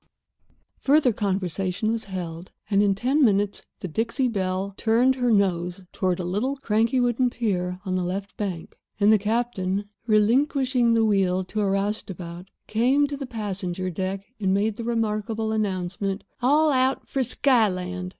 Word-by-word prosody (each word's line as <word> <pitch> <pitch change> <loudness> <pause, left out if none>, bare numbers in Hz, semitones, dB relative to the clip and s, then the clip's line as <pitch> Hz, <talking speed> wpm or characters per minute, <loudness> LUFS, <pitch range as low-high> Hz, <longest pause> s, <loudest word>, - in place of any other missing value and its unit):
Further 280 -3 +4
conversation 195 +1 -1
was 230 -1 -2
held, 175 -3 -6 0.2
and 200 0 +4
in 200 -1 +3
ten 265 +8 +2
minutes 205 -3 +2 0.2
the 185 - -3
Dixie 230 - 0
Belle 190 -2 -2
turned 235 +5 +3
her 250 -2 0
nose 185 -2 +1
toward 185 -2 0
a - - -2
little, 210 +10 -1
cranky 230 0 +1
wooden 245 +1 +2
pier 180 -7 -2
on 185 - -2
the 185 -1 0
left 195 +3 -4
bank, 185 -6 -5 0.2
and 210 +1 +5
the 215 - +4
captain, 205 -3 -1 0.2
relinquishing 245 +2 +3
the 225 -1 +3
wheel 190 -3 +2
to 210 +3 -3
a 200 - +1
roustabout, 190 -3 -3 0.2
came 255 +6 +2
to 285 0 -4
the 275 -2 -6
passenger 190 -5 -3
deck 190 +3 -3
and 190 -2 +1
made 210 +2 0
the 235 - -5
remarkable 220 -1 -1
announcement: 195 -1 -2 0.2
"All 300 +5 +4
out 260 0 +1
for 270 - -1
Skyland." 185 -8 +1
205 Hz, 155 wpm, -25 LUFS, 185-235 Hz, 0.2 s, and